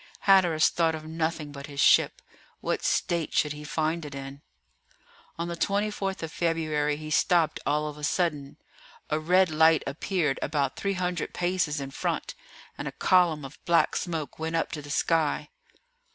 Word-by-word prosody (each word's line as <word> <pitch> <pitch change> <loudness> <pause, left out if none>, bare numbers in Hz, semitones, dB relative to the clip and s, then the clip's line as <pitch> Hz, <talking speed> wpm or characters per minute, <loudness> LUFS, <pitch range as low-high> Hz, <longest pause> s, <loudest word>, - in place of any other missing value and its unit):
Hatteras 180 -5 +5
thought 165 -1 +1
of 155 0 -8
nothing 160 -1 -3
but 140 0 -8
his 140 -1 -8
ship. - - +4 0.4
What - - -2
state 170 -2 0
should 150 -1 +2
he 150 0 -9
find 160 +2 -1
it 145 -2 -7
in? 135 +1 -8 1.0
On 170 +1 -3
the 170 - -4
24th 200 0 -1
of 160 - -4
February 155 -3 0
he 155 0 -7
stopped 165 +1 +2
all 150 +1 +1
of 150 0 -7
a - - -11
sudden. 150 -3 -1 0.5
A 155 - +1
red 180 +2 +3
light 160 +1 +4
appeared 150 0 -1
about 145 -3 -1
300 180 -3 -2
paces 175 -4 0
in 135 -1 -6
front, - - -3 0.5
and - - -4
a - - -3
column 170 -6 +3
of 135 - -12
black 170 -1 +3
smoke 160 -6 -4
went 160 +1 -2
up 165 - 0
to 150 - -5
the 145 - -11
sky. 160 0 +1
160 Hz, 165 wpm, -27 LUFS, 150-170 Hz, 1.0 s, Hatteras